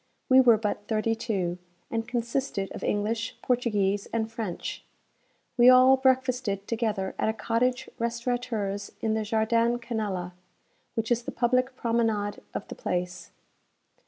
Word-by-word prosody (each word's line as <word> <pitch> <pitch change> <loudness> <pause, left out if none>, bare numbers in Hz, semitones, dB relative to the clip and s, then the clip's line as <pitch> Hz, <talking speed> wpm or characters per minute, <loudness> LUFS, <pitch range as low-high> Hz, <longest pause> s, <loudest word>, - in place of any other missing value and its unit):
We 260 0 +8
were 235 -3 +6
but 210 -1 -3
thirty 220 0 +1
two, 190 -6 -2 0.3
and 225 -1 -2
consisted 240 -3 -2
of - - -7
English, 220 +2 -1
Portuguese, 205 -5 +1
and 225 -1 -1
French. 220 -7 -5 0.7
We 240 +1 +8
all 255 +1 +8
breakfasted 255 -6 +1
together 215 -5 -1
at - - +2
a - - 0
cottage 245 +3 0
restaurateur's 230 -4 -2
in 220 -1 +1
the 220 - 0
Jardin 230 +2 +2
Canella, 210 -7 -3 0.6
which 225 +1 -2
is 240 0 +3
the - - -6
public 255 +2 +1
promenade 225 -4 0
of - - -4
the - - -7
place. 180 - -3
225 Hz, 135 wpm, -27 LUFS, 205-245 Hz, 0.7 s, We